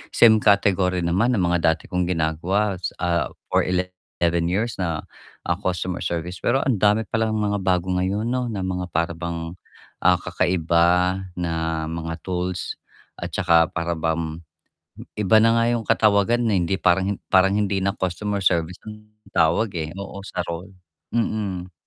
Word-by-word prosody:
same 110 -2 +7
category 95 -3 +2
naman 100 +9 +2
na 100 - 0
mga 85 -2 +3
dati 80 - -18
kong 90 -1 0
ginagawa 90 +5 0
s 90 - -3
ah, 85 -6 +1 0.2
for - - +3
11 90 -2 -1
years 105 +7 -1
na, 85 -4 -2 0.4
ah, 85 - 0
customer 90 -2 -2
service, 85 +1 -3
pero 135 +3 +1
ang 125 -7 0
dami 105 +2 +3
pa 115 - -2
lang 110 -1 0
mga 105 -1 0
bago 95 -1 0
ngayon 95 +5 -1
'no, 125 0 -1
na 105 -5 -3
mga 90 -1 -2
para 85 +1 +1
bang, 85 0 -5 0.4
ah, - - +4
kakaiba 90 +1 +2 0.2
na 80 -2 -2
mga 80 0 -4
tools 90 -1 -3 0.4
at - - -5
tsaka 85 -3 +3
para 85 -1 -2
bang 80 0 -2 0.8
iba 105 +1 +4
na 115 +1 +4
nga 115 - +3
yung 115 -3 -2
katawagan, 110 +3 +3
eh, 100 - +2
hindi 90 +3 0
parang 95 +2 +2 0.2
parang 95 +1 +5
hindi 100 -2 0
na 100 +2 -1
customer 100 +2 -2
service 85 0 +1
ang 105 0 -11 0.2
tawag, 85 +6 +2
eh. 80 -1 -3
Oo, 100 0 -7
sa - - -3
role. 90 +3 -7 0.4
Mm. 100 -6 -2
90 Hz, 160 wpm, -23 LUFS, 85-105 Hz, 0.8 s, same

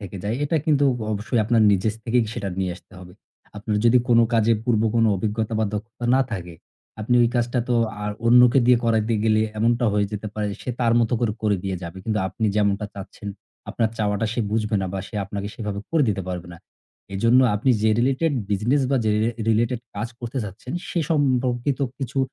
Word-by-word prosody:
থেকে 100 -1 -8
যায় 110 +4 -1
এটা 160 +3 0
কিন্তু 145 -2 +3 0.3
অবশ্যই 110 +3 -1
আপনার 115 0 +3
নিজের 100 +2 +1
স - - -14
থেকেই 120 +1 +2
সেটা 100 - -3
নিয়ে 95 -2 -1
আসতে 95 - -21
হবে। 90 -1 -12 0.4
আপনার 105 0 -2
যদি 120 +2 +6
কোনো 115 -1 +5
কাজে 115 0 +3
পূর্ব 115 -3 +2
কোনো 115 -1 +4
অভিজ্ঞতা 110 +3 -2
বা 110 - +2
দক্ষতা 115 +3 -6
না 135 - +4
থাকে, 90 -4 -5 0.5
আপনি 120 +3 0
ওই 115 - +4
কাজটা 120 +1 0
তো 120 - +2 0.3
আর 105 - -2 0.2
অন্যকে 125 +2 +6
দিয়ে 125 -1 +6
করাইতে 115 0 +1
গেলে 110 -1 +3 0.2
এমনটা 120 +2 +2
হয়ে 105 -1 +1
যেতে 105 +1 -4
পারে 105 -1 -2 0.2
সে 125 - -3
তার 115 -1 +3
মতো 115 +1 0
করে, 115 -3 +1
করে 105 -2 +2
দিয়ে 95 -1 -2
যাবে। 85 +2 -7
কিন্তু 110 -2 -1
আপনি 110 +4 -2
যেমনটা 105 0 +1
চাচ্ছেন, 100 +1 -9 0.4
আপনার 115 -1 0
চাওয়াটা 105 0 0
সে 120 - -1
বুঝবে 105 -1 0
না - - -1
বা 95 - -3
সে - - -15
আপনাকে 100 +1 -5
সেভাবে 105 -3 -4
করে 165 -3 +3
দিতে 95 -2 -1
পারবে 90 0 -6
না। - - -14 0.6
এজন্য 115 +6 +4
আপনি 120 +6 +1
যে 110 - +4
related 135 +5 +1 0.2
business 120 +8 +1
বা 135 - +3
যে 110 - +2
রে 115 - +1 0.2
related 115 +2 +1 0.2
কাজ 115 - -3
করতে 120 +3 -4
চাচ্ছেন 105 +6 -8 0.2
সে 175 - -2
সম্পর্কিত 130 -2 +1 0.2
কিছু 135 0 -4
110 Hz, 205 wpm, -23 LUFS, 105-120 Hz, 0.6 s, যদি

